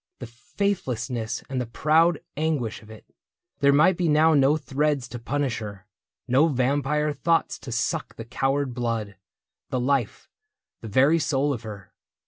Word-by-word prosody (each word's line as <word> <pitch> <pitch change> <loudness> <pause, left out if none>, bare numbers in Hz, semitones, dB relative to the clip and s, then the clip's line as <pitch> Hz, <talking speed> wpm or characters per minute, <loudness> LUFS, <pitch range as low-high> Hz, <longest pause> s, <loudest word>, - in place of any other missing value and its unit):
The 125 - -7
faithlessness 125 - -3
and 130 -2 -2
the 125 - -4
proud 160 +6 +2
anguish 145 -7 -2
of 110 - -17
it. 110 -1 -13 0.5
There 140 0 +5
might 155 +5 +4
be 175 -3 +1
now 155 +2 +4
no 145 +1 +4
threads 145 -2 -1
to 120 - -7
punish 135 0 -2
her. 100 -2 -8 0.4
No 135 +6 +4
vampire 145 +2 0
thoughts 165 +3 0
to 130 - -9
suck 145 +7 -2
the 115 - -8
coward 135 +2 -1
blood. 115 -4 -3 0.5
The 130 - -1
life, 130 -3 -1 0.5
the 115 - -7
very 135 +10 +4
soul 145 -1 0
of 120 - -6
her. 105 -5 -10
135 Hz, 155 wpm, -25 LUFS, 120-150 Hz, 0.5 s, There